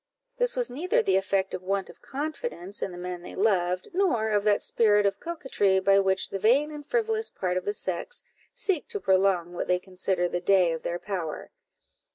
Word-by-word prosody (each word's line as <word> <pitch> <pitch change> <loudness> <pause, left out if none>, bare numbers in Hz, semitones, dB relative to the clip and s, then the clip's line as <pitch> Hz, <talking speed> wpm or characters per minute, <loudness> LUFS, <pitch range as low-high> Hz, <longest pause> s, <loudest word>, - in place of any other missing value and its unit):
This - - +3
was - - -1
neither 365 - +1
the 395 - +2
effect 195 0 0
of 185 - -4
want 195 +1 -1
of - - -13
confidence 280 - -4
in - - -2
the 175 - -9
men 180 0 -5
they - - -9
loved, 185 - +1
nor 280 - +1
of 205 -1 +2
that 205 -1 +3
spirit 210 -2 +3
of 200 - 0
coquetry 265 - 0
by 195 +1 +4
which 190 -1 +1
the 195 - -3
vain 270 +9 +3
and 295 -1 -8
frivolous 445 +4 0
part 180 -1 -2
of 185 - -2
the 205 - 0
sex 205 - -4 0.3
seek 365 -7 -1
to 455 -3 -2
prolong 190 - +2
what 175 - -3
they 180 - +3
consider 185 -1 -2
the 175 0 -3
day 185 -2 +4
of 160 - -5
their 175 - -2
power. 175 -5 -5
195 Hz, 200 wpm, -27 LUFS, 185-295 Hz, 0.3 s, by